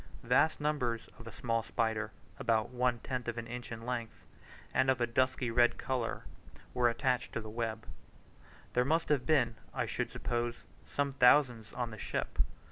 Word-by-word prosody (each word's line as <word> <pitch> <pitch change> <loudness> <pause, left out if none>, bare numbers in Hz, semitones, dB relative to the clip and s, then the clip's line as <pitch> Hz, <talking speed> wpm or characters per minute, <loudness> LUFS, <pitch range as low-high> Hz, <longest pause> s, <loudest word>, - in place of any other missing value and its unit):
Vast 135 +6 +3
numbers 135 -6 -1
of 115 - -10
a - - -6
small 115 +1 0
spider, 110 -1 -1 0.3
about 115 0 +1
one 125 -1 +1
tenth 125 -2 -3
of 120 0 -2
an 115 - -3
inch 120 +1 -6
in 115 0 -6
length, 120 -2 -4 0.5
and 130 +1 +3
of 130 -1 +3
a 120 - +3
dusky 130 0 +1
red 120 +1 +4
colour, 125 -3 -2 0.5
were 125 -1 +4
attached 125 +1 0
to - - -1
the 110 -1 -7
webs. 110 -1 -3 0.9
There 125 - +4
must 160 +5 +1
have 145 -4 +2
been, 120 -8 +3 0.2
I - - +1
should - - -2
suppose, 120 0 -2 0.2
some 140 -1 -1
thousands 125 -4 +5
on 120 -2 -2
the 110 - -8
ship. - - -3
120 Hz, 175 wpm, -33 LUFS, 115-130 Hz, 0.9 s, thousands